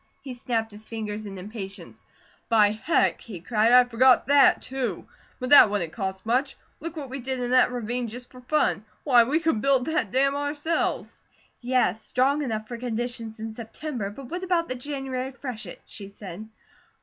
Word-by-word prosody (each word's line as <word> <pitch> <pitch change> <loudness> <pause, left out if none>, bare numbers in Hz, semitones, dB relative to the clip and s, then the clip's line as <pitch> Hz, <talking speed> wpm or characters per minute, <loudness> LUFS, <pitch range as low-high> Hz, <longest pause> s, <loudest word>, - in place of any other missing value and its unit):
He 265 - -6
snapped 230 -2 -2
his 210 +1 -10
fingers 215 -2 -5
in 195 -1 -8
impatience. 200 +1 -8 0.5
"By 215 -3 +5
heck!" 220 +10 +1
he 205 -7 -8
cried, 220 +5 +2
"I 250 0 +8
forgot 245 +1 +4
THAT, 280 0 +5
too! 255 -8 -3 0.3
But 255 +1 -4
that 285 - +9
wouldn't 180 -6 -2
cost 190 -2 -4
much. 255 +5 +1 0.2
Look 330 +2 -6
what 275 -4 -6
we 270 - -4
did 260 +1 -2
in 245 0 -2
that 255 -1 +5
ravine 245 0 -3
just 245 +3 -7
for 255 - -13
fun. 250 -5 +1 0.2
Why, 245 -5 +5
we 290 +7 +1
could 320 -10 0
build 270 -1 +2
that 290 -11 -1
dam 275 +2 +2
ourselves!" 290 +3 -2 0.4
"Yes, 245 -4 +1
strong 275 +4 +1
enough 220 -5 -3
for 240 - -6
conditions 235 -2 -4
in 220 0 -5
September, 230 0 -5
but 255 +6 -11
what 355 +1 -3
about 355 -3 0
the - - -1
January 265 0 -4
freshet?" 245 -8 -7
she 200 -2 -9
said. 200 +1 -9
245 Hz, 180 wpm, -25 LUFS, 220-270 Hz, 0.5 s, that